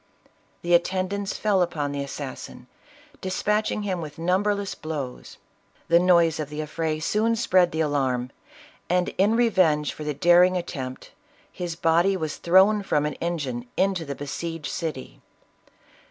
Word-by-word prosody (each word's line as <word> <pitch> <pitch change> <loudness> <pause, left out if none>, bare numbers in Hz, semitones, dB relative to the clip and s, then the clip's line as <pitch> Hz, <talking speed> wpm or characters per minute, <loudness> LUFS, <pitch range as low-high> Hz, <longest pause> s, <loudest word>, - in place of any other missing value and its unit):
The 175 0 +1
atten 185 +2 +2
dants 200 0 -3
fell 205 -3 +2
upon 150 -5 -1
the 140 0 -3
assassin, 135 -2 -8 0.6
dispatching 210 +3 -1
him 185 -4 -2
with 150 -2 -8
numberless 195 +4 0
blows. 145 -5 -6 0.5
The 170 - +6
noise 170 -3 +4
of 150 -2 -4
the 150 0 -6
affray 155 0 -2
soon 215 +8 +1
spread 185 -6 +3
the 160 - -1
alarm, 130 -5 0 0.6
and, 180 0 +2
in 205 +4 +4
revenge 185 -11 +2
for 155 - -8
the 150 -1 -3
daring 175 +4 +5
attempt, 130 -7 -6 0.4
his 175 -2 -5
body 170 +4 +2
was 155 -4 -4
thrown 190 +4 +4
from 150 -6 0
an 150 - -2
engine 140 -8 -3
into 190 -3 +1
the 140 -2 -5
besieged 160 +3 -5
city. 155 -6 -5
170 Hz, 145 wpm, -25 LUFS, 150-185 Hz, 0.6 s, The